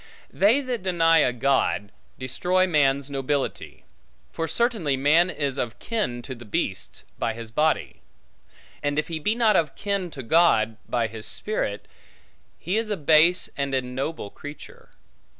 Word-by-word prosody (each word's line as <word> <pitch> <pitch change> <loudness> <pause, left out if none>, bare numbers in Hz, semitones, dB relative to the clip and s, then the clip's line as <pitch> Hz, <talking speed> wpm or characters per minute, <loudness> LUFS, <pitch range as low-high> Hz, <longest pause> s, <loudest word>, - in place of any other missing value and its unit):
They 225 +8 +4
that 250 -5 -3
deny 165 -3 +3
a 125 - +3
God, 125 -5 0 0.3
destroy 180 +8 +1
man's 140 -5 +2
nobility; 140 0 -3 0.5
for 165 - -3
certainly 180 - 0
man 155 +6 +4
is 140 -5 -2
of 115 -1 -3
kin 125 - -3
to 130 - -6
the 120 -1 -11
beasts, 105 - -3 0.2
by 115 - -1
his 115 -1 -8
body; 155 +5 0 0.8
and, 145 0 -1
if 155 - -1
he 165 -1 -3
be 210 +8 0
not 230 -3 +3
of 155 -4 +1
kin 200 -3 -2
to 135 -5 -8
God, 115 -7 +3
by 120 -2 +1
his 110 -1 -6
spirit, 105 - -3 0.7
he 185 +6 -2
is 225 -1 -1
a 210 - -1
base 160 +4 +4
and 140 -1 -1
ignoble 130 -2 -3
creature. 145 0 -11
150 Hz, 150 wpm, -25 LUFS, 130-180 Hz, 0.8 s, They